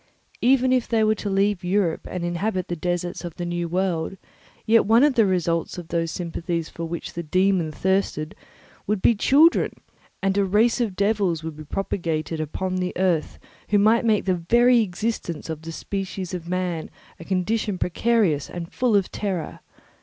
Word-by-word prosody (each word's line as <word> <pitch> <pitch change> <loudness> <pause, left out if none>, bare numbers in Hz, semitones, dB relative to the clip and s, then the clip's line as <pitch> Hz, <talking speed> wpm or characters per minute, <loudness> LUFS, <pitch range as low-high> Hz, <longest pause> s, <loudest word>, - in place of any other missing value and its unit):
Even 255 +1 +4
if 255 -2 +1
they 225 -2 +2
were 215 0 +4
to 210 -1 -4
leave 195 -1 +1
Europe 180 -2 0
and 180 -1 -4
inhabit 185 +2 -2
the 175 - -1
deserts 175 +2 -3
of 175 -2 -6
the 175 - -4
new 175 0 -2
world, 180 0 -1 0.5
yet 225 -2 +4
one 230 +4 +5
of 295 -1 +4
the 240 - +4
first 205 - +3
results 170 -2 0
of 175 -2 -8
those 165 -1 0
sympathies 170 -1 -3
for 165 - -6
which 165 0 -5
the 170 - -4
dæmon 185 0 +1
thirsted 190 -4 -1 0.5
would 210 -1 -1
be - - +6
children, 290 +10 +4 0.5
and 195 +1 +2
a - - +4
race 215 +6 +2
of 215 -6 -1
devils 200 -5 +1
would 160 -1 -5
be 155 - -9
propagated 165 -2 -3
upon 185 +5 -3
the 180 0 -2
earth 180 -4 0 0.3
who 205 - +4
might 220 +4 +4
make 220 -3 +2
the 190 - +2 0.2
very 240 +1 +6
existence 180 -5 -3
of 155 -1 -6
the 165 0 -7
species 190 +1 -5
of 175 -1 -5
man 180 -3 -2 0.3
a - - -8
condition 195 +3 -1
precarious 180 -5 +1
and 170 -1 -7
full 245 -4 +2
of 195 -2 +1
terror. 190 -6 -3
185 Hz, 185 wpm, -24 LUFS, 170-210 Hz, 0.5 s, be